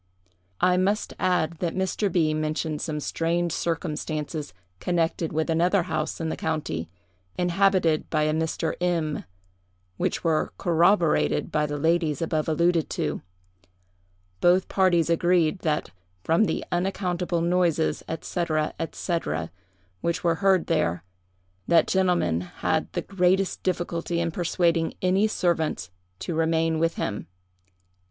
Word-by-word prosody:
"I 180 0 +4
must 200 +3 0
add, 170 -3 +1
that 170 -2 -2
Mr. 190 +2 0
B—— 160 -3 +2
mentioned 155 0 -2
some 150 -2 -3
strange 170 +3 -1
circumstances 155 -2 -3 0.3
connected 170 -2 0
with 160 +1 0
another 175 +3 +2
house 160 -3 -3
in 165 -1 -2
the - - -2
county, 150 - -3 0.5
inhabited 180 -3 +2
by 155 -1 +1
a 155 0 +1
Mr. 160 0 -1
M——, 165 -4 0 0.7
which - - -1
were 160 -2 +1
corroborated 170 0 +2
by 150 -1 +1
the 145 0 -3
ladies 160 -1 +1
above 160 -1 -1
alluded 170 +1 +2
to. - - -2 1.2
Both 180 +1 +4
parties 180 -4 +3
agreed 170 0 +2
that, 155 - -1 0.3
from 165 +7 +3
the - - -2
unaccountable 180 -1 -1
noises, 170 -2 +1 0.2
&c., 175 -1 -2 0.5
&c., 175 -2 -1 0.8
which 170 +1 -1
were 170 -1 +3
heard 190 -3 +4
there, 85 - 0 0.6
that 170 - +5
gentleman 180 - +1
had 90 - -2
the - - -2
greatest 190 0 +1
difficulty 175 -2 -1
in 170 -1 0
persuading 170 -1 +1
any 190 +3 +3
servants 160 - -1 0.3
to 175 - -3
remain 160 0 +1
with 165 +1 +1
him. 105 - -3
170 Hz, 125 wpm, -25 LUFS, 155-180 Hz, 1.2 s, that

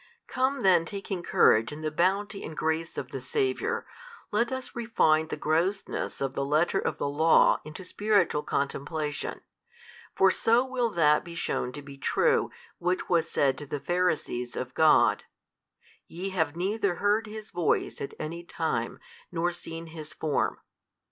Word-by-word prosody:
Come 265 +2 0
then 180 -3 +5
taking 195 0 -5
courage 115 -8 +4
in 150 +1 -7
the 155 0 -2
bounty 195 +5 0
and 160 - -7
grace 160 +1 -1
of - - -5
the - - -5
Saviour, 435 +2 -1 0.5
let 235 +4 +1
us 260 -1 -5
refine 160 -10 +2
the - - -4
grossness 165 +6 -1
of 135 -1 -1
the 140 - -1
letter 155 +7 +2
of - - -2
the - - -1
law 155 +3 +4
into 155 +5 -9
spiritual 200 -5 +1
contemplation: 145 +2 -2 0.7
for 190 0 +5
so 230 +6 +3
will 255 -2 0
that 150 -6 +3
be 170 -2 -9
shewn 125 -6 -1
to 145 - -7
be 140 -1 -11
true 470 - +2 0.3
which 180 +1 -1
was 165 -2 +2
said 135 -2 +1
to 145 - -8
the 145 - -3
Pharisees 155 -9 -1
of 125 0 -4
God; 160 +2 +4 0.8
Ye 180 +4 -5
have 160 -6 -1
neither 195 +1 0
heard 210 +4 +1
His 215 0 -8
Voice 175 -3 0
at 140 - -5
any 165 +2 -5
time 160 -9 -2 0.3
nor 175 0 0
seen 165 -1 -7
His 155 -2 -9
Form. 155 -3 0
170 Hz, 160 wpm, -28 LUFS, 155-205 Hz, 0.8 s, then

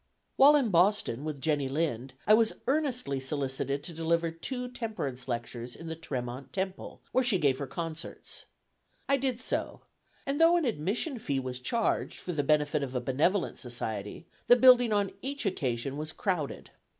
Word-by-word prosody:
While 285 +2 +8
in 260 -7 +2
Boston 175 - +2
with 150 -2 -4
Jenny 145 -2 +1
Lind, 135 -4 -2
I 210 - +6
was 225 0 +4
earnestly 255 - 0
solicited 135 0 -2
to 170 - -6
deliver 165 +1 +1
two 250 +10 -4
temperance 215 - -5
lectures 120 0 -4
in 165 - -10
the 160 - -3
Tremont 130 -4 -5
Temple, 190 0 -4
where 260 - +3
she 240 -6 +3
gave 140 -6 +2
her 140 - -3
concerts. 165 +3 -6 0.6
I 275 - +4
did 260 -3 -1
so; 255 - -2 0.4
and 280 +3 -1
though 335 +1 +7
an 335 - +1
admission 230 - -1
fee 140 -9 -1
was 130 -1 -4
charged 230 - 0
for 180 - -4
the 150 - +1
benefit 150 +1 +2
of 135 -2 -4
a - - +2
benevolent 150 +10 +1
society, 110 - -5 0.2
the 245 - +9
building 245 -2 +7
on 205 -2 +1
each 280 -1 -4
occasion 135 -7 -1
was 155 +1 -4
crowded. 175 -8 -2
160 Hz, 170 wpm, -30 LUFS, -, 0.6 s, the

